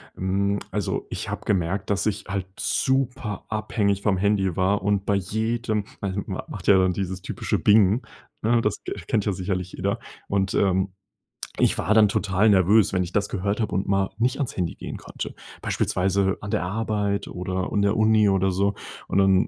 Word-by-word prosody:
Hm. 100 +2 0
Also, - - -2
ich - - -5
habe - - -5
gemerkt, 95 +1 0
dass 100 -1 +1
ich 110 - -1
halt 100 -2 -2
super 130 -6 0
abhängig 105 -2 0
vom 100 -3 +2
Handy 95 -2 +1
war, 95 +2 +2
und 100 0 0
bei 100 - +2
jedem 110 +2 -1 0.2
ma 100 -2 -2
ma - - -4
macht - - -8
ja 100 - +7
dann 95 -1 +3
dieses 95 0 -3
typische - - -2
Bing, 105 +2 +5 0.4
ne, 115 +2 +3
das 105 -2 -1
ke - - -4
kennt 105 -3 +1
ja 105 - +1
sicherlich 90 0 -3
jeder. - - -1 0.3
Und, 95 -1 0
ähm, 95 0 +2 0.7
ich - - +3
war 105 - +1
dann 110 -1 +6
total 100 +1 +2
nervös, 100 +2 +4
wenn 90 - +2
ich 90 - -6
das 100 -1 +1
gehört 100 +2 -2
habe 110 -5 -1
und 95 - 0
mal 95 -1 +1
nicht 125 +3 +1
ans 140 -4 -3
Handy 90 -3 -1
gehen - - -7
konnte. - - -7 0.3
Beispielsweise 95 +1 +1
an 105 - -7
der 105 -3 0
Arbeit 105 +1 -1
oder 95 +1 -3
in 100 - +2
der 100 +1 +2
Uni 110 -1 +4
oder 95 0 +2
so. 100 +2 +1 0.4
Und - - 0
dann 95 0 +4
100 Hz, 190 wpm, -24 LUFS, 95-105 Hz, 0.7 s, ja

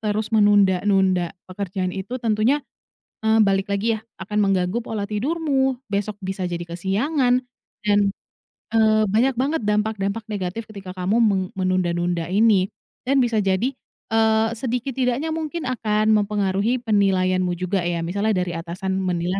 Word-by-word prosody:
terus 215 0 -2
menunda-nunda 195 -3 +3 0.2
pekerjaan 185 -1 -3
itu 205 +7 -5
tentunya, 230 +6 +2 0.6
eee, 220 0 +5
balik 195 -1 +2
lagi 220 +2 0
ya, - - -14 0.2
akan 210 +3 -3
mengganggu 195 +1 +1
pola 220 -3 -4
tidurmu. 265 +3 0
Besok 205 +1 -1
bisa 190 -1 -3
jadi 175 -1 -4
kesiangan 245 - 0 0.4
dan, 205 -1 +3 0.8
eee, 215 -1 +4
banyak 245 +6 +3
banget 270 +4 0
dampak 210 +1 +1
dampak 200 +3 -2
negatif 210 +2 -4
ketika 195 -3 -8
kamu 185 +4 -1
me 215 -4 +4 0.2
menunda-nunda 175 -2 0
ini. 200 -1 +3 0.4
Dan 270 -1 +4
bisa 230 -3 +1
jadi, 195 +6 +1 0.4
eee, 220 0 +3
sedikit 245 +3 -3
tidaknya 260 +5 -1
mungkin 320 +1 -3
akan 220 -4 +1
mempengaruhi 205 +1 +1
penilaianmu 185 -4 +2
juga 185 +2 -1
ya. 170 -1 -1
Misalnya 200 +5 0
dari 180 -1 -1
atasan 180 +3 -3
menilai 180 +1 -1
205 Hz, 140 wpm, -22 LUFS, 185-225 Hz, 0.8 s, eee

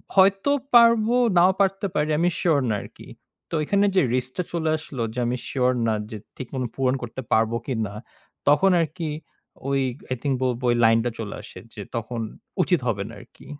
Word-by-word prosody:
হয়তো 195 +6 +4 0.2
পারবো, 230 0 +6 0.2
নাও 180 +2 +6
পারতে 195 +1 +1
পারি, 150 +1 +1
আমি 175 +1 +3
শিওর 160 -5 +3
না 105 - +1
আরকি। - - -13 0.4
তো - - -13
এখানে 200 +6 +2
যে 185 - +5
রিস্কটা 130 +8 -2
চলে 160 -2 0
আসলো। 145 -5 -7
যে 125 - -4
আমি 125 +1 -1
শিওর 125 -2 +1 0.2
না 110 - +2 0.2
যে, 110 - -6 0.2
ঠিকমতো 130 0 -4
পূরণ 130 -1 +1
করতে 120 +2 -6
পারবো 110 +1 +2
কিনা। 110 -6 -2 0.6
তখন 190 +7 +5
আরকি 165 +1 -3 0.6
ওই 140 0 +1 0.3
i - - -2
think 140 -2 0
ব - - +1
বলবো 125 0 -2
ওই - - +2
লাইনটা 115 +1 +4
চলে 105 -2 -5
আসে - - -11
যে, 105 - -7
তখন 115 +1 -3 0.4
উচিত - - +2
হবে - - 0
না - - -10
আরকি। - - -18
135 Hz, 185 wpm, -24 LUFS, 120-180 Hz, 0.6 s, পারবো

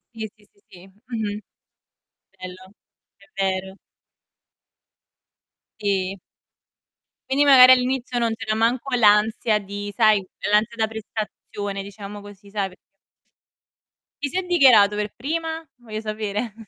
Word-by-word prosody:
Sì, 220 -1 -5
sì, 210 -1 -25
sì, - - -31
sì. 180 0 -15
Mh-mh. 210 0 -5 1.0
Bello, 185 +1 -10 0.5
è 195 - -21 0.2
vero. 190 0 -2 2.0
Sì. 195 -1 -1 1.1
Quindi 280 +2 +3
magari 255 -2 +9
all'inizio 250 -1 +1
non 230 -1 0
c'era 220 -1 -3
manco 235 +4 0
l'ansia 215 0 +3
di 205 0 -7
sai, 215 -4 +4 0.3
l'ansia 215 +2 +2
da 220 -1 0
prestazione, 210 -2 -6
diciamo 200 +1 -9
così, 205 0 -14
sai, 200 -1 -2
perché 185 - -18 1.4
Chi 285 - 0
si 360 - -4
è 375 - 0
dichiarato 255 - +5
per 210 0 -3
prima? 325 +6 -3 0.3
Voglio 225 -4 -7
sapere. 215 0 -4
215 Hz, 120 wpm, -22 LUFS, 200-240 Hz, 2.0 s, magari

